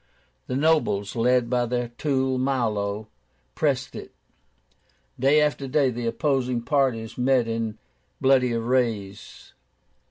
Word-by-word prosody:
The 125 - -3
nobles, 135 -10 +1
led 125 +1 +2
by 120 0 0
their 120 0 -2
tool 130 0 -1
Milo, 110 -5 -1 0.5
pressed - - -1
it. - - -8 1.1
Day 140 +4 +4
after 145 -2 0
day 135 0 +2
the 120 0 -4
opposing 125 -2 0
parties 125 -6 0
met 125 -2 +2
in 115 -1 -3 0.4
bloody 130 -2 +3
affrays. 115 -4 -2
125 Hz, 115 wpm, -24 LUFS, 115-135 Hz, 1.1 s, Day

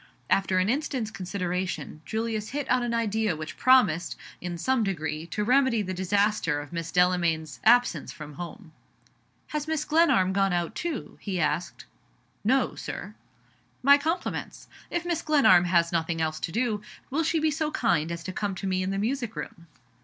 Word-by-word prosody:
After 195 -1 +2
an 185 +1 +2
instant's 255 -3 -1
consideration, 180 -4 -3
Julius 220 -1 -2
hit 285 0 -3
on 255 0 +4
an 240 -1 -1
idea 220 -4 0
which 155 +1 -7
promised, 210 -10 +4 0.3
in 175 -1 -4
some 245 +7 +1
degree, 160 -4 -3
to 210 +6 -2
remedy 250 -1 +3
the 185 -1 -4
disaster 190 -4 +1
of 145 0 -9
Mrs. 170 -1 -4
Delamayn's 170 -4 +1
absence 240 -8 +4
from 150 -1 -9
home. 175 - -8 0.8
"Has 300 0 -3
Mrs. 315 -1 -1
Glenarm 300 - +4
gone 195 -1 +2
out, 175 -1 -1
too?" 325 -7 -5
he 190 -3 -3
asked. 155 +2 -1 0.6
"No, 260 +6 +2
Sir." - - -6 0.7
"My 280 +2 +7
compliments. 330 +4 -3 0.2
If 345 -1 -2
Mrs. 340 -2 -2
Glenarm 265 - +5
has 170 -1 +2
nothing 165 -1 -1
else 155 -1 -1
to 165 - -3
do, 225 -1 0 0.3
will 300 +5 +1
she 330 +1 +1
be 310 0 +2
so 310 +1 -1
kind 175 - +1
as 170 0 -5
to 185 - -5
come 200 -1 -2
to 185 - -6
me 185 -1 0
in 185 - -1
the 195 - -1
music 235 +2 -2
room?" 170 -1 -7
195 Hz, 175 wpm, -27 LUFS, 170-255 Hz, 0.8 s, My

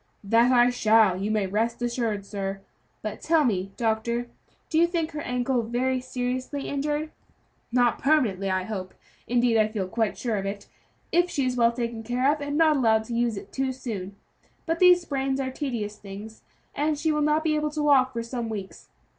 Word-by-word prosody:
"That 230 +5 +4
I 245 0 +5
shall, 220 -5 +4
you 195 +3 -2
may 215 -2 +1
rest 225 +5 -1
assured, 235 -4 -2
sir; 195 -1 -4 0.4
but 215 0 -5
tell 320 -1 +3
me 195 -6 0
doctor, 235 +1 -1 0.4
do 320 - +1
you 340 - +5
think 335 -2 -2
her 300 -1 -5
ankle 250 0 0
very 250 +3 0
seriously 255 +2 -3
injured?" 295 +2 -2 0.6
"Not 245 0 +2
permanently, 230 -10 +2
I 185 0 0
hope; 185 -2 -6 0.3
indeed, 240 -1 +3
I 215 - +4
feel 210 -4 -3
quite 220 +1 -1
sure 230 -4 -1
of 195 0 -3
it, 200 0 -6 0.4
if 350 +1 +3
she 280 -6 -1
is 255 -1 0
well 235 -1 +4
taken 235 -1 -4
care 250 +5 +1
of, 305 - -6
and 285 0 -2
not 310 -2 +4
allowed 220 -4 +3
to 235 - -6
use 235 -2 0
it - - -9
too 265 0 0
soon; 210 -7 -6 0.5
but 330 0 -1
these 360 -1 +7
sprains 270 -4 -2
are 260 -1 -2
tedious 235 -7 -4
things, 205 +2 -10 0.3
and 300 +1 0
she 315 +2 +1
will 300 0 0
not 300 +1 +2
be 315 -1 +1
able 300 0 0
to 300 0 -3
walk 265 -3 +4
for 230 -2 -3
some 235 -1 -4
weeks. 200 -3 -7
240 Hz, 195 wpm, -26 LUFS, 220-285 Hz, 0.6 s, these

